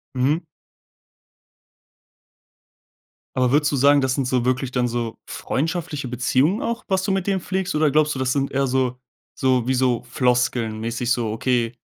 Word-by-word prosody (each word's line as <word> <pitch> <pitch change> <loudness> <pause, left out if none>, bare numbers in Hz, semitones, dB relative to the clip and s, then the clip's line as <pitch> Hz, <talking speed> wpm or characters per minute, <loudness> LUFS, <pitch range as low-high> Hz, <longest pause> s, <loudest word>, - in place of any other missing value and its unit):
Mhm. 140 +6 +1 2.9
Aber 125 -1 +2
würdest 150 +1 +3
du - - 0
sagen, 140 +2 +5
das 130 -1 +1
sind 135 -3 -1
so 125 -2 +1
wirklich 130 0 0
dann 125 -1 +1
so 120 -1 -3
freundschaftliche 155 -2 -3
Beziehungen 130 - +1
auch, 235 0 -3
was 190 -2 +1
du 195 - 0
mit 190 -1 -1
denen 195 -1 +1
pflegst? 190 -1 -2
Oder 155 -1 +3
glaubst 150 0 +2
du, - - -4
das 130 -1 +1
sind 140 -1 -1
eher 135 0 +1
so 125 -1 0 0.4
so 130 -2 +1
wie 130 - +2
so 125 -2 +1
Floskeln 120 -2 0
mäßig 115 +2 -2
so, 115 -3 0
okay, 120 +1 0
130 Hz, 165 wpm, -22 LUFS, 125-150 Hz, 2.9 s, sagen